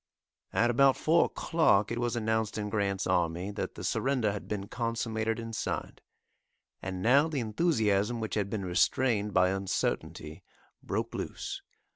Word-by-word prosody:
At 120 Hz, +1 st, +3 dB
about 135 Hz, +2 st, +4 dB
four 165 Hz, +2 st, +4 dB
o'clock 110 Hz, -11 st, +2 dB
it 120 Hz, -, -2 dB
was 120 Hz, 0 st, -1 dB
announced 110 Hz, -2 st, 0 dB
in 105 Hz, -1 st, -3 dB
Grant's 100 Hz, -2 st, 0 dB
army 90 Hz, +1 st, 0 dB
that 105 Hz, -, -4 dB
the -, -, -7 dB
surrender 130 Hz, -6 st, +1 dB
had 100 Hz, -, -6 dB
been 100 Hz, -2 st, -4 dB
consummated 115 Hz, -1 st, -2 dB
and 115 Hz, -1 st, -6 dB
signed. -, -, -4 dB, 0.8 s
And 95 Hz, -1 st, -4 dB
now 140 Hz, +7 st, +5 dB
the 155 Hz, -4 st, -2 dB
enthusiasm 110 Hz, -, +1 dB
which 110 Hz, -1 st, -4 dB
had 100 Hz, -2 st, 0 dB
been 100 Hz, -2 st, -3 dB
restrained 105 Hz, +4 st, +2 dB
by 90 Hz, -1 st, +4 dB
uncertainty 95 Hz, -5 st, -2 dB, 0.4 s
broke -, -, -2 dB
loose. -, -, -5 dB
110 Hz, 150 wpm, -30 LUFS, 100-120 Hz, 0.8 s, now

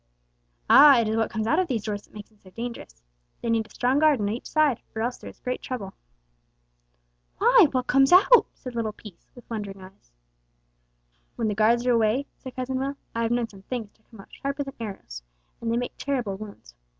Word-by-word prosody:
"Ah! 285 Hz, -4 st, +8 dB
it 230 Hz, -, +1 dB
is 220 Hz, -, 0 dB
what 225 Hz, 0 st, 0 dB
comes 220 Hz, -1 st, -3 dB
out 310 Hz, +9 st, +2 dB
of 370 Hz, -, +1 dB
these 235 Hz, -8 st, -2 dB
doors 205 Hz, -1 st, -3 dB
that -, -, -25 dB
makes 210 Hz, -1 st, -10 dB
them 215 Hz, -2 st, -29 dB
so 190 Hz, -, -17 dB
dangerous. 185 Hz, -, -8 dB, 0.4 s
They 235 Hz, -, 0 dB
need 225 Hz, -1 st, 0 dB
a -, -, -27 dB
strong 255 Hz, +3 st, +1 dB
guard 305 Hz, -4 st, +4 dB
on 205 Hz, -1 st, -1 dB
each 230 Hz, +4 st, -5 dB
side, 305 Hz, -6 st, +2 dB
or 220 Hz, -, -2 dB
else 245 Hz, +1 st, -3 dB
there -, -, -9 dB
is -, -, -16 dB
great 250 Hz, 0 st, -4 dB
trouble." 205 Hz, -7 st, -6 dB, 1.4 s
"Why, 465 Hz, -2 st, +6 dB
what 255 Hz, -2 st, -1 dB
comes 270 Hz, +1 st, +4 dB
out?" 395 Hz, +7 st, +7 dB
said 255 Hz, -, -9 dB
little 225 Hz, -2 st, -2 dB
Peace, 210 Hz, -5 st, -14 dB
with 245 Hz, -, -15 dB
wondering 205 Hz, -4 st, -6 dB
eyes. 185 Hz, -, -16 dB, 1.2 s
"When 225 Hz, -2 st, -1 dB
the -, -, -1 dB
guards 230 Hz, +4 st, +2 dB
are 250 Hz, -, +3 dB
away," 230 Hz, +3 st, +2 dB
said 260 Hz, -1 st, -10 dB
Cousin 260 Hz, 0 st, -3 dB
Will, 275 Hz, +1 st, -3 dB, 0.2 s
"I 230 Hz, -, -2 dB
have 230 Hz, -, 0 dB
known 240 Hz, -1 st, 0 dB
some 195 Hz, -2 st, -15 dB
things 225 Hz, 0 st, -5 dB
to -, -, -34 dB
come 220 Hz, -4 st, -13 dB
out -, -, -20 dB
sharper 280 Hz, +1 st, -3 dB
than 275 Hz, -1 st, -9 dB
arrows, 195 Hz, -, -7 dB, 0.4 s
and 230 Hz, 0 st, -2 dB
they 230 Hz, -, +1 dB
make 245 Hz, 0 st, -3 dB
terrible 250 Hz, -8 st, -2 dB
wounds. 200 Hz, -, -11 dB
230 Hz, 220 wpm, -25 LUFS, 210-260 Hz, 1.4 s, Ah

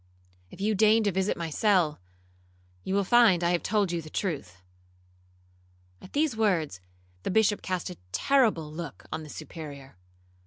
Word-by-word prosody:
If -, -, -14 dB
you 210 Hz, +2 st, +1 dB
deign 215 Hz, +2 st, +4 dB
to 205 Hz, -, +2 dB
visit 190 Hz, +2 st, 0 dB
my 165 Hz, -1 st, -4 dB
cell, 175 Hz, -, +2 dB, 0.8 s
you 190 Hz, -, -2 dB
will 200 Hz, -, +2 dB
find 205 Hz, -4 st, +5 dB
I 170 Hz, -, +2 dB
have 175 Hz, -, +1 dB
told 205 Hz, -4 st, +1 dB
you 170 Hz, -1 st, -2 dB
the 155 Hz, -, -11 dB
truth.' 140 Hz, -, -4 dB, 1.4 s
At 185 Hz, -, -14 dB
these 295 Hz, -4 st, +1 dB
words, 170 Hz, -, 0 dB, 0.4 s
the -, -, -3 dB
Bishop 210 Hz, +1 st, +2 dB
cast 185 Hz, -1 st, -3 dB
a 180 Hz, -, -10 dB
terrible 210 Hz, -, +2 dB
look 165 Hz, -2 st, -7 dB
on 155 Hz, -, -3 dB
the 155 Hz, -, -10 dB
Superior. 145 Hz, -, -9 dB
180 Hz, 160 wpm, -28 LUFS, 155-210 Hz, 1.4 s, find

